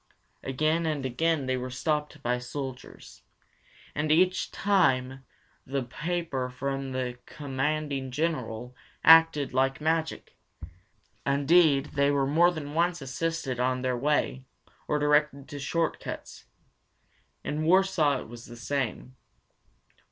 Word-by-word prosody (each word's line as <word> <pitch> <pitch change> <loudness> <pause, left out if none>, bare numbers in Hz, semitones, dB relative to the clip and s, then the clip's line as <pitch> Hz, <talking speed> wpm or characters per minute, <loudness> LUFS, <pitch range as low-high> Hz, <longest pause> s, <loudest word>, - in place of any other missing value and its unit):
Again 155 +5 0
and 150 -4 -2
again 145 +3 0
they 130 0 0
were 130 0 -4
stopped 150 +2 -2
by 125 +1 0
soldiers, 130 +1 -8 0.7
and 150 +1 -1
each 185 +3 +3
time 135 -10 +1 0.4
the 135 0 -2
paper 150 -1 -3
from 135 +1 -4
the 125 -1 -3
Commanding 140 -1 -2
General 125 -5 -3 0.3
acted 160 -4 +6
like 135 +1 +1
magic. 160 +1 -1 0.9
Indeed, 140 +1 +3
they 140 0 +3
were 140 -1 +2
more 165 +5 +4
than 150 -4 -5
once 175 +2 +1
assisted 135 -1 -3
on 130 0 0
their 130 -1 0
way, 135 0 0 0.4
or 150 - +1
directed 150 -1 +2
to 145 -2 -7
short 165 +3 -1
cuts. - - -8 1.0
In 150 +1 -2
Warsaw 170 -5 +3
it - - -10
was 120 0 -10
the 120 - -11
same. 130 0 -3
140 Hz, 120 wpm, -28 LUFS, 130-160 Hz, 1.0 s, acted